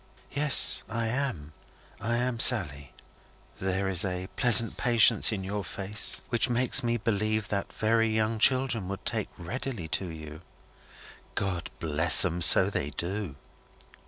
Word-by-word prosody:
"Yes, 145 0 +4
I 115 0 -3
am. 110 - -4 0.5
I 120 +3 -3
am 125 -1 -3
Sally." 75 - +2 0.7
"There 95 +1 -3
is 95 0 0
a 90 -1 -5
pleasant 115 -3 +4
patience 120 -2 +3
in 100 -3 -5
your 100 +2 -5
face 100 +3 -3
which 120 0 0
makes 125 +1 +1
me 120 0 -2
believe 110 -1 -2
that 100 -1 -4
very 115 +1 0
young 110 0 -2
children 130 -5 +1
would 100 0 -8
take - - -3
readily 115 0 -7
to 85 +4 -3
you." 80 -1 -10 0.9
"God 95 -3 -4
bless 80 +2 +4
'em! 90 0 -3
So 80 - +6
they 70 - -4
do." 90 -1 -6
105 Hz, 140 wpm, -26 LUFS, 90-115 Hz, 0.9 s, So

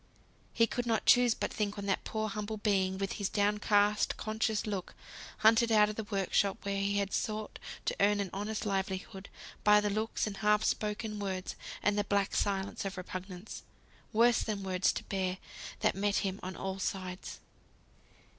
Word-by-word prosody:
He 230 - +4
could 240 +1 -3
not 225 -1 +1
choose 245 -2 +6
but - - -3
think 210 -1 -2
on 200 - -4
that 195 -1 0
poor 220 0 -2
humble 210 +1 -4
being, 190 -3 +1
with 195 0 -2
his 200 - 0
downcast 210 0 +2
conscious 220 0 -1
look; 200 -4 -4 0.4
hunted 225 +1 +5
out 210 -1 +6
of 210 - -4
the 220 - -4
work 200 -3 -2
shop, 200 -1 +3
where 200 0 -1
he 200 +1 +1
had 200 -1 -1
sought 215 -1 -2 0.3
to - - 0
earn 205 +1 +4
an 195 -3 -2
honest 210 +2 -3
livelihood, 190 -1 -3 0.3
by 210 0 +7
the 210 0 0
looks, 215 +2 -1
and 205 -2 -5
half 210 +1 +3
spoken 210 0 -1
words, 190 -2 -3 0.3
and 205 0 +2
the - - +2
black 200 -1 0
silence 195 -1 -1
of 195 -1 -4
repugnance 185 +1 -7 0.5
(worse 235 +2 +5
than 210 -3 -3
words 185 -1 +2
to - - -5
bear), 190 -2 -2 0.4
that - - +3
met 200 +1 0
him 195 +1 -2
on 185 0 -5
all 190 +2 -4
sides. 185 -1 -4
205 Hz, 180 wpm, -32 LUFS, 195-215 Hz, 0.5 s, by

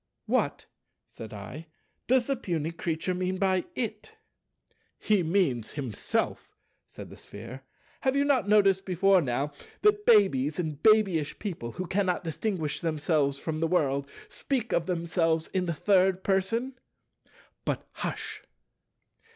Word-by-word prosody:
"What," - - 0 0.4
said 110 - -10
I, 115 +11 -8 0.4
"does 255 0 +3
the 275 - 0
puny 170 - -2
creature 165 +1 -2
mean 185 +1 -1
by 185 -2 +1
'it'?" 220 - -4 0.8
"He 210 -3 +2
means 160 - 0
himself," 130 -8 -3 0.3
said - - -10
the - - -10
Sphere: 115 +6 -10 0.4
"have 265 0 +1
you 280 - +3
not 260 -8 +2
noticed 195 -2 +4
before 190 +1 +3
now, 140 +1 -1 0.3
that 420 0 +3
babies 155 - +4
and 155 -5 -3
babyish 200 -9 +3
people 165 - -5
who 185 - -4
cannot 185 -1 0
distinguish 165 -1 -2
themselves 155 -3 +1
from 155 +2 -4
the 165 - +1
world, 140 -5 +1 0.2
speak 250 -4 -3
of 165 - +1
themselves 165 -2 0
in 185 -2 -1
the - - +1
Third 190 +1 +3
Person? 225 +7 0 0.8
But - - -3
hush!" - - -5
180 Hz, 135 wpm, -28 LUFS, 155-200 Hz, 0.8 s, noticed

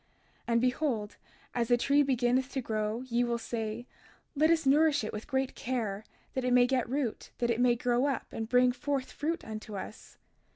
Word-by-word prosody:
32:37 - - -39 0.4
And 230 -1 +2
behold, 250 -4 -1 0.4
as 235 -1 0
the 245 - +4
tree 280 +4 +3
beginneth 255 -1 +1
to 270 - -1
grow, 220 -1 -2
ye 245 -2 0
will 240 -1 0
say: 225 0 -4 0.5
Let 310 +3 +4
us 330 -2 +3
nourish 290 -1 +4
it 215 - -4
with 215 +1 -6
great 265 -2 -1
care, 220 -5 -3 0.3
that 260 - -2
it 250 0 +1
may 245 0 +6
get 250 -2 0
root, 265 -4 -2
that 240 -1 +1
it 235 +1 0
may 245 -1 +4
grow 245 +3 +1
up, 275 - -1
and 225 0 -4
bring 250 0 +5
forth 275 +1 -3
fruit 330 +3 -3
unto 215 -1 -7
us. 205 - -9
245 Hz, 200 wpm, -30 LUFS, 230-270 Hz, 0.5 s, may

